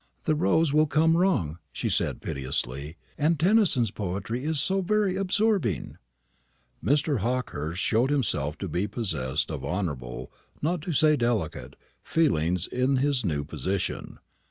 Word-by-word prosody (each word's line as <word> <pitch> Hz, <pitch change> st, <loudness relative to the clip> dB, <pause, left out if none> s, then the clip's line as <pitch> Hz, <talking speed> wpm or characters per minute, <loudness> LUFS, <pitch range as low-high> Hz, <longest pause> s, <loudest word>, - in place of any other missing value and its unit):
"The 155 Hz, -, +2 dB
rows 160 Hz, -1 st, +2 dB
will 155 Hz, +1 st, +4 dB
come 160 Hz, +2 st, +3 dB
wrong," 165 Hz, -, +1 dB
she -, -, -3 dB
said -, -, 0 dB
piteously, 70 Hz, +3 st, -3 dB, 0.2 s
"and 155 Hz, +1 st, +2 dB
Tennyson's 175 Hz, -, +3 dB
poetry 105 Hz, +6 st, -4 dB
is 155 Hz, 0 st, +1 dB
so 190 Hz, +7 st, +2 dB
very 200 Hz, 0 st, +1 dB
absorbing!" 195 Hz, -, 0 dB, 0.8 s
Mr. 145 Hz, -1 st, +2 dB
Hawkehurst 95 Hz, -, -2 dB
showed 120 Hz, +4 st, +2 dB
himself 95 Hz, -, 0 dB
to -, -, -4 dB
be 95 Hz, +4 st, -1 dB
possessed 80 Hz, -, -2 dB
of 75 Hz, -4 st, -5 dB
honourable, 75 Hz, -10 st, -4 dB, 0.3 s
not 170 Hz, +2 st, -1 dB
to 175 Hz, +3 st, -4 dB
say 155 Hz, 0 st, +4 dB
delicate, 120 Hz, -, -2 dB, 0.3 s
feelings 90 Hz, -, +1 dB
in 130 Hz, +2 st, +1 dB
his 135 Hz, -2 st, +1 dB
new 75 Hz, -7 st, -1 dB
position. 95 Hz, +6 st, -3 dB
125 Hz, 135 wpm, -27 LUFS, -, 0.8 s, will